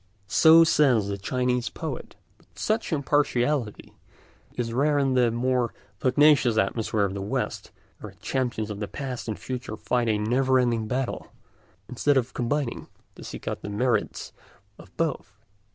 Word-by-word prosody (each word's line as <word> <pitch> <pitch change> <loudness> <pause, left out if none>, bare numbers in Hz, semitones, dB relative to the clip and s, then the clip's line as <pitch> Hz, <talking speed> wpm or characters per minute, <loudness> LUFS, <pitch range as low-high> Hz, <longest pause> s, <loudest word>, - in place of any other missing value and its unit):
So 160 +11 +7
says 130 -10 +3
the 100 - -3
Chinese 125 +3 -1
poet; - - -6 0.2
but - - -27
such 220 -1 -1
impartiality 140 -5 0 0.6
is 115 -1 -3
rare 145 +4 +2
in 135 -2 +2
the 125 -2 +3
more 120 0 0 0.2
pugnacious 130 -3 +4
atmosphere 110 0 0
of 95 - -3
the 100 - -5
West, 100 - -3 0.3
where - - -9
the - - -24
champions 120 -5 -2
of 105 0 -5
past 130 -4 -5
and 110 - -3
future 125 -4 -6
fight 120 0 0
a 110 - +2
never 130 +5 +2
ending 120 -3 +1
battle, 130 +1 -3 0.6
instead 140 +3 +1
of 125 -1 -1
combining 125 +1 -2 0.3
to - - -12
seek - - -9
out - - -3
the - - -6
merits 120 +5 -1 0.5
of - - -14
both. 160 - -2
125 Hz, 150 wpm, -26 LUFS, 110-135 Hz, 0.6 s, So